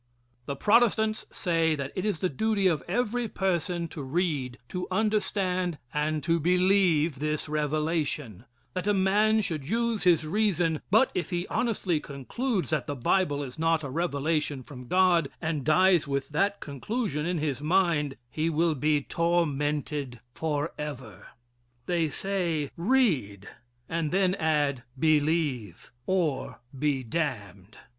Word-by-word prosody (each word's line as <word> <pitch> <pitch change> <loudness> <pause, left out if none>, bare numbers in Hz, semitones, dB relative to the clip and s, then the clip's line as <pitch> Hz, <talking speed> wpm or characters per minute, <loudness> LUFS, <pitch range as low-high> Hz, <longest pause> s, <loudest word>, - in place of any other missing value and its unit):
The 140 - -2
Protestants 220 - +2
say 165 -3 +1
that 140 -2 -4
it 185 - -2
is 200 -6 -1
the 185 - +2
duty 200 +6 0
of 170 -5 +3
every 240 +4 0
person 175 -3 -1
to 150 - -7
read, 135 -4 -1
to 180 -1 -4
understand, 190 -4 0 0.2
and 150 0 -1
to 165 +1 +2
believe 175 -4 +3
this 150 +1 -2
revelation 150 - -2 0.3
that 185 +2 -3
a 205 - +3
man 210 +3 +3
should 155 -7 -4
use 230 0 0
his 175 -4 +4
reason; 175 -3 +1
but 220 +7 +4
if 180 - -2
he 175 -1 -2
honestly 190 -9 0
concludes 180 - -3
that 150 -6 0
the 145 - -3
Bible 145 +2 +1
is 130 +1 -8
not 165 -1 +2
a 140 - -5
revelation 150 -3 -1
from 125 -2 -11
God, 180 -3 +3
and 160 -3 -2
dies 175 +2 +4
with 140 -1 -2
that 195 +6 0
conclusion 150 - -3
in 180 0 0
his 145 -3 -2
mind, 155 -4 +1
he 155 +4 0
will 165 +1 +2
be 150 0 +1
tormented 150 -6 -1
forever. 150 -3 -4 0.6
They 170 -1 +1
say: 170 -5 -1
"Read," 165 - +1 0.4
and 165 -2 -1
then 185 +1 +2
add: 150 -7 +1 0.2
"Believe, 150 - 0 0.2
or 170 -7 0 0.2
be 140 -1 0
damned." 110 - -4
160 Hz, 135 wpm, -27 LUFS, 145-185 Hz, 0.6 s, his